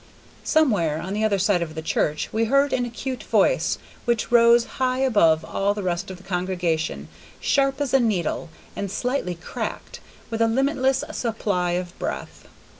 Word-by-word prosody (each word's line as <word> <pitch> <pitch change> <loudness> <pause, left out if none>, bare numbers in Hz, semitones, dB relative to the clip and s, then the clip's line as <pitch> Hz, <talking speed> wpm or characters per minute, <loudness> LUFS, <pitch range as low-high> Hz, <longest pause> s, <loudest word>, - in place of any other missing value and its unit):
Somewhere 200 - +2
on 185 +4 -5
the 210 +1 -1
other 210 -2 +2
side 195 -1 +2
of 160 -2 -4
the 160 - -4
church 150 -1 0
we 225 +1 +2
heard 275 +4 +3
an 245 -1 +1
acute 250 +2 -5
voice - - +2 0.3
which 235 -2 0
rose 235 0 +6 0.2
high 255 0 +2
above 185 -12 +3
all 200 +4 0
the 205 - -4
rest 175 -1 -2
of 185 - -7
the 185 - -17
congregation, 180 -4 -2 0.3
sharp 275 -1 +1
as 285 -3 -2
a 270 - +6
needle, 190 -8 -1 0.3
and 200 - -3
slightly 245 -4 -2
cracked, 170 - -6 0.3
with 225 0 -2
a 230 - +5
limitless 265 +2 +1
supply 200 -7 -1
of 180 0 -3
breath. - - -5
215 Hz, 170 wpm, -23 LUFS, 180-255 Hz, 0.3 s, rose